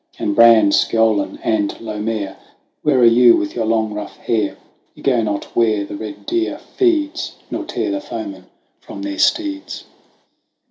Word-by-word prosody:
And 100 - -2
Bran, 115 -3 +6
Sgeolan, 110 -2 +2
and 105 -3 0
Lomair, 105 -3 -4 0.5
Where 150 -3 +2
are - - +7
you 120 +1 +7
with 100 - -3
your 115 -2 -1
long 110 -1 0
rough 105 -1 -7
hair? 110 -3 -1 0.4
You - - -15
go 125 -4 +2
not 105 -2 -4
where 110 -3 +2
the - - -7
red 105 0 -8
deer 345 0 -1
feeds, 330 -4 -1 0.2
Nor - - -3
tear - - -2
the 300 -1 -2
foeman 315 0 -7 0.3
from - - -9
their 300 0 -4
steeds. 300 -2 0
S. - - -20
115 Hz, 165 wpm, -19 LUFS, -, 0.5 s, are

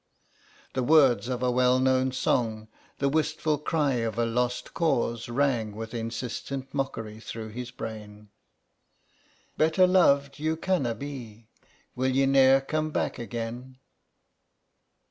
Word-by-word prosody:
The 130 - -1
words 135 -3 +4
of 125 -1 -3
a 125 - +2
well 125 0 +3
known 130 0 +3
old 130 - -4
song, 110 -3 0 0.3
the 140 - +1
wistful 155 0 0
cry 150 -4 0
of 115 -1 -2
a 120 - +2
lost 125 +2 -2
cause, 120 -8 0
rang 120 -5 0
with 110 +1 -7
insistent 120 +3 -5
mockery 115 -6 -4
through 110 0 -7
his 120 +3 -6
brain: 105 -2 -8 1.3
"Better 160 +4 +4
loved 140 -7 +3
you 160 +1 -1
canna 155 -10 0
be, 115 -4 -9 0.5
Will 130 +1 0
ye 135 0 +4
ne'er 135 0 +5
come 155 +3 -2
back - - -2
again?" 120 +3 -6
125 Hz, 130 wpm, -27 LUFS, 115-140 Hz, 1.3 s, ne'er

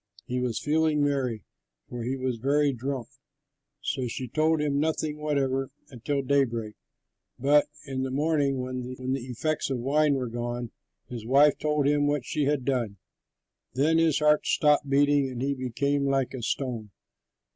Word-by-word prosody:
He 125 0 -2
was 125 -3 -1
feeling 155 0 +1
merry, 130 -7 -1 0.4
for 120 - -6
he 130 +3 -2
was 130 -2 -2
very 140 +4 +2
drunk; 130 -1 -4 0.7
so 130 -3 -2
she 125 +2 -5
told 155 +5 +2
him 145 -1 0
nothing 155 0 -1
whatever 135 -3 0 0.2
until 140 +3 -2
daybreak. 120 -6 0 0.6
But 145 +3 +4 0.2
in 135 -1 -3
the 130 - -2
morning, 140 -1 +1
when 130 0 -4
the 130 +1 -4
effects 150 +6 -2
of 135 - -1
the 120 - -6
wine 145 +2 +3
were 130 -2 -2
gone, 120 0 -4 0.4
his 120 -3 -7
wife 140 +5 +4
told 150 -1 +1
him 145 0 +3
what 145 -3 0
she 150 +3 -1
had 140 -3 0
done. 120 -7 -1 0.8
Then 155 +5 +3
his 160 -3 +3
heart 150 0 +3
stopped 150 -2 +3
beating 140 0 +3
and 125 -2 -6
he 140 +2 0
became 140 +2 -1
like 135 -1 0
a 130 - -5
stone. 115 -3 -3
135 Hz, 165 wpm, -27 LUFS, 125-145 Hz, 0.8 s, But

